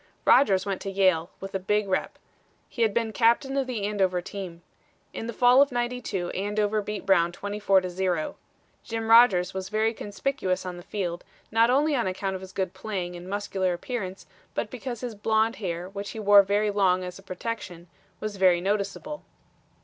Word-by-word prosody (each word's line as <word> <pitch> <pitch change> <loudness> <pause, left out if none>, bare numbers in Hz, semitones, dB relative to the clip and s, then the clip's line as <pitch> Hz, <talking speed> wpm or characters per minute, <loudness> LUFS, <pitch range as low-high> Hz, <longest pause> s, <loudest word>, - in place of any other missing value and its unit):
Rodgers 195 -8 +5
went 195 -2 -3
to 195 - -4
Yale 185 -4 +2
with 195 0 -8
a 195 - -1
big 210 +2 0
rep. 190 - -1 0.5
He 235 - -6
had 225 -2 +4
been 225 0 -1
captain 235 +4 +2
of 270 -2 0
the 235 -5 -3
Andover 195 -3 +1
team. 175 -2 -7 0.5
In 225 - -5
the - - -3
fall 245 +3 +5
of 280 0 +3
'92 240 -7 -2
Andover 210 +2 0
beat 210 0 -5
Brown 175 -3 +4
24 200 0 +1
to 185 - -4
0. 180 -3 -1 0.5
Jim 225 -1 -3
Rodgers 195 -6 +6
was 190 0 -5
very 220 +2 +1
conspicuous 205 -3 -2
on 180 -1 -5
the - - -9
field, 175 -2 -4 0.3
not 225 +2 +4
only 290 +4 +3
on 235 -6 0
account 190 +1 -2
of 190 - -5
his 190 0 -10
good 190 -2 -2
playing 190 -3 -4
and 175 +1 -9
muscular 195 -2 -1
appearance, 190 -2 -5 0.3
but - - -2
because 250 -2 -6
his 245 -2 -4
blond 220 +2 +1
hair, 175 -3 -4
which 200 +1 -6
he 220 - -7
wore 205 -1 +7
very 205 +2 +1
long 185 -2 +2
as 180 +1 -7
a - - -13
protection, 185 -2 -6 0.3
was 215 -2 -5
very 185 -2 +4
noticeable. 200 +10 -2
200 Hz, 190 wpm, -26 LUFS, 185-225 Hz, 0.5 s, wore